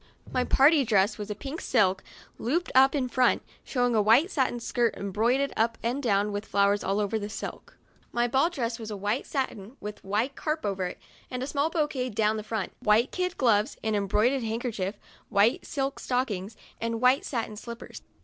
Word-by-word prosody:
My 255 - +1
party 285 +3 +5
dress 210 -2 +2
was 210 0 -5
a 210 - -3
pink 280 +8 -6
silk, 195 -6 +2 0.4
looped 330 +11 -1
up 270 +2 +6
in 265 -3 0
front, 250 0 +2 0.2
showing 245 -2 0
a 220 - +4
white 235 - +4
satin 255 -4 0
skirt 235 0 0
embroidered 230 +8 0
up 225 +1 +1
and 245 +5 -1
down 205 -4 +1
with 205 +1 -4
flowers 200 0 +2
over 205 +3 0
the 205 0 -5
silk. - - -7 0.3
My 240 0 +1
ball 265 +7 +3
dress 240 -8 -3
was 220 -1 -6
a 210 - -4
white 205 +6 -1
satin 260 -4 -4
with 210 +1 -7
white 220 +8 -1
crape 310 -3 -2
over 190 -2 -1
it, - - -7 0.3
and 255 +1 -3
small 285 +2 0
bouquets 280 -8 -1
down 215 0 +2
the - - -3
front, 215 -3 -3
white 220 +4 +3
kid 365 -1 -2
gloves, 225 -1 +2
an 220 0 0
embroider 210 +6 +2
ed 255 - -4
handkerchief, 220 -3 -2 0.3
white 210 +2 +2
silk 275 -2 -2
stockings, 220 -5 -2 0.2
and 230 0 -2
white 255 +3 +4
satin 230 -4 -3
slippers. 235 +2 -9
230 Hz, 190 wpm, -27 LUFS, 210-265 Hz, 0.4 s, up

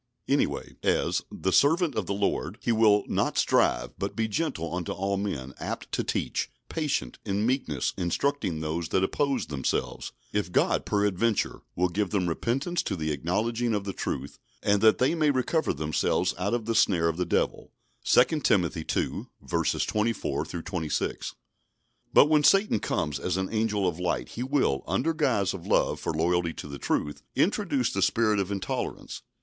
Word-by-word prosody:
Anyway, - - 0
as - - +1
"the 95 - -1
servant 160 +2 +4
of 105 -6 -2
the - - -1
Lord," 100 -2 -1
he 120 - 0
will 110 -2 +4
"not - - 0
strive; - - +2
but - - -3
be 110 -1 0
gentle 105 - -2
unto 90 -1 -3
all 100 +1 -1
men, 70 -10 -3
apt - - -5
to - - 0
teach, - - -2 0.2
patient, 150 - -2
in 100 +2 -1
meekness 120 - 0
instructing 90 - -1
those 80 +1 -2
that 95 - +2
oppose 135 +3 0
themselves; 70 -4 -2 0.2
if 105 -3 -1
God - - +2
peradventure 105 +2 +1
will 90 +1 +2
give 100 +2 -1
them 100 -4 0
repentance 135 - -1
to - - -3
the 80 -3 -2
acknowledging 110 +10 0
of 100 - -1
the 100 -1 -4
truth; 70 -4 -4 0.2
and 100 -1 +3
that 110 0 +6
they 130 +5 +2
may 155 -3 +2
recover 145 +4 +1
themselves 75 +1 0
out 100 +5 0
of 115 -3 -3
the 115 - 0
snare 85 -6 +3
of 80 0 -1
the 90 - +1
Devil" 85 - -1 0.3
(2 125 +5 +4
Timothy 90 - +1
ii. - - -2 0.6
24 110 +2 -1
26). 85 -2 -3 0.8
But - - +7
when 150 0 +3
Satan 195 - +4
comes 75 -7 -1
as 90 +4 -1
an 95 0 -1
angel 110 -3 +1
of 90 -1 -2
light 85 -9 -1
he 115 - -6
will, 130 - +1
under 95 - +1
guise 125 - +1
of 95 -3 -8
love - - +2
for - - -2
and 80 - -3
loyalty 85 0 +1
to - - -8
the 70 -1 -7
truth, 75 -1 -1
introduce 145 - +1
the 95 - -1
spirit 110 0 +3
of 100 0 -1
intolerance. 100 -1 -4
100 Hz, 175 wpm, -27 LUFS, 85-120 Hz, 0.8 s, But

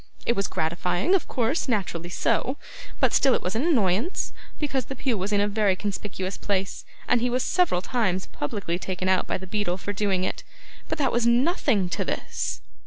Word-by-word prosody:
It 235 - +2
was 195 -1 0
gratifying, 175 - 0
of 385 - +2
course, 255 +6 0
naturally 180 -6 -1
so, 260 +9 0 0.4
but - - +3
still 270 -2 +5
it - - -1
was 180 - -1
an 225 - +1
annoyance, 245 - +1 0.3
because 275 -3 -1
the 270 - -6
pew 255 -2 0
was 195 +1 -2
in 205 - +3
a 205 - +3
very 205 -2 +2
conspicuous 195 -1 -4
place, 195 -1 -1 0.2
and 245 - +3
he 245 - +2
was 250 +1 +1
several 350 - +2
times 190 -7 0
publicly 175 +2 -3
taken 185 0 -3
out 185 -1 +3
by - - 0
the 190 - -8
beadle 185 -2 -1
for 205 +2 -4
doing 195 -2 +1
it. - - -2 0.5
But - - -1
that 275 -4 +2
was 240 0 +2
nothing 240 - +3
to - - -1
this. - - -3
205 Hz, 195 wpm, -26 LUFS, 185-250 Hz, 0.5 s, still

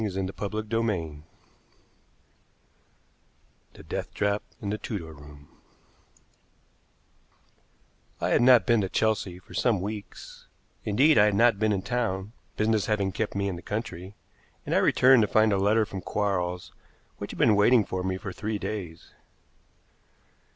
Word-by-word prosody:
CHAPTER 100 +1 -3
VII 105 -9 -2 2.5
THE - - -14
DEATH - - -4
TRAP 100 0 0 0.2
IN 100 - -4
THE 105 - -3
TUDOR 85 -8 -6
ROOM 75 0 -15 2.7
I - - -1
had - - +3
not 125 -1 +6
been 115 -3 +3
to 95 - -2
Chelsea 105 -5 0
for 90 - -16
some 115 -6 +1
weeks 105 +2 -8 0.4
indeed, 135 +7 +4
I 105 - +7
had 105 -1 +2
not 115 -1 +4
been 110 0 +2
in 95 -2 -1
town, 110 -5 -2 0.3
business 110 -2 +1
having 100 -3 0
kept 105 +2 -3
me 100 0 -1
in 95 -3 -3
the - - -9
country 100 -3 -6 0.5
and - - -2
I - - +4
returned 130 -1 +5
to 105 - +2
find 110 0 +3
a - - +2
letter 105 +3 +3
from 95 -3 -7
Quarles 90 -3 -2 0.5
which - - -6
had - - -8
been 110 -3 +4
waiting 105 +2 +4
for 95 0 -4
me 95 0 -2
for 95 0 -7
three 110 +3 -3
days. 90 -6 -6
105 Hz, 145 wpm, -27 LUFS, 95-110 Hz, 2.7 s, I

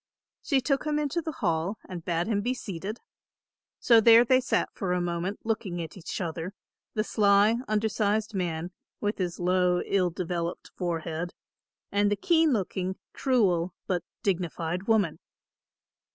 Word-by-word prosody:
She 275 -3 +2
took 275 +3 0
him 300 0 +1
into 300 +3 0
the 320 - -4
hall 170 - -1
and 175 -3 -7
bade 170 0 0
him 215 -2 0
be 250 +4 -1
seated. 200 0 -6 0.8
So 230 -2 +5
there 230 +2 +8
they 255 +1 +4
sat 265 - 0
for 185 -4 -2
a 180 - +1
moment 175 +3 -2
looking 215 -5 -2
at 165 -2 -6
each 180 -4 -5
other, 170 +2 -4 0.4
the 215 - +1
sly 205 +1 +4
undersized 215 0 0
man, 175 -2 -2 0.3
with 205 0 -2
his 175 -2 -2
low 180 0 +2
ill 185 -3 +1
developed 170 0 -4
forehead, 170 -1 -3 0.6
and 205 0 +2
the - - +3
keen 320 - +3
looking, 190 -4 -1 0.2
cruel, 185 - +1
but 180 -3 -1 0.2
dignified 180 -1 -1
woman. 210 -8 +2
195 Hz, 150 wpm, -28 LUFS, 175-220 Hz, 0.8 s, there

